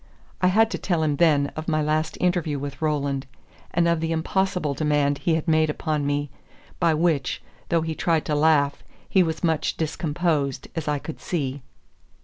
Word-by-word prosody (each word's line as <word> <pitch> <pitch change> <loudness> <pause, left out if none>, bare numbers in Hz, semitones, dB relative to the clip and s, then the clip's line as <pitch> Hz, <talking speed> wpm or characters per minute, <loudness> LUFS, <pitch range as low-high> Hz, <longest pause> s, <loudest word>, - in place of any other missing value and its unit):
I 185 - +5
had 220 +5 +4
to - - -3
tell 170 -4 0
him 150 -2 +1
then 145 -4 +3
of 155 +1 -5
my 155 -2 +1
last 155 +1 0
interview 175 -5 +1
with 140 0 -6
Roland, 140 -3 -1 0.4
and 170 0 +2
of 170 -1 +2
the 165 0 -2
impossible 180 -1 0
demand 145 -1 +1
he 165 - +1
had 160 +1 -3
made 155 -1 +3
upon 150 -1 -1
me, 145 -1 -1 0.5
by 165 -3 +3
which, 155 -4 +1 0.3
though 165 -1 +2
he 160 0 -2
tried 160 0 0
to 150 - -1
laugh, 145 -2 +3 0.2
he 190 - +4
was 160 -1 -1
much 160 -2 0
discomposed, 155 -4 -1
as 160 -3 -3
I 150 -1 +1
could 155 +3 -8
see. 140 -5 -2
155 Hz, 180 wpm, -24 LUFS, 145-165 Hz, 0.5 s, I